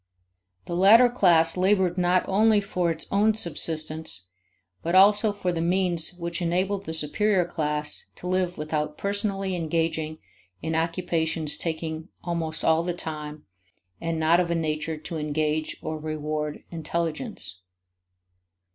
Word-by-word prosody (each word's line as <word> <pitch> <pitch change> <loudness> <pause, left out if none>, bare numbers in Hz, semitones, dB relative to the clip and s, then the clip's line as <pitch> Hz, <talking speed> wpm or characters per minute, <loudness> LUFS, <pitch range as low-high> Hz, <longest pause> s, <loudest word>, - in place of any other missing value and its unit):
The 170 - -4
latter 220 +7 +7
class 170 -8 +4
labored 185 -1 +2
not 180 0 +2
only 215 +2 +4
for 180 -4 -1
its 165 -1 -1
own 210 +2 +3
subsistence, 155 - -2 0.6
but 170 +2 -1
also 205 +3 +6
for 200 -3 -2
the 165 -1 -2
means 175 -1 0
which 170 0 -4
enabled 190 +3 0
the 160 - -4
superior 180 +5 +2
class 150 -3 -2
to - - -12
live 180 -1 0
without 150 0 -2
personally 200 -2 -1
engaging 160 -1 -1 0.4
in 160 - -3
occupations 165 -2 0
taking 160 0 -3
almost 165 -2 -2
all 160 0 +4
the 175 0 -2
time 150 -3 -6 0.6
and 165 -1 -2
not 160 +2 +4
of 175 -1 +1
a 170 - +1
nature 155 -1 -2
to 160 +2 -6
engage 155 +1 -1
or 155 0 -3
reward 150 -1 -3
intelligence. 165 - -3
165 Hz, 135 wpm, -26 LUFS, 155-185 Hz, 0.6 s, latter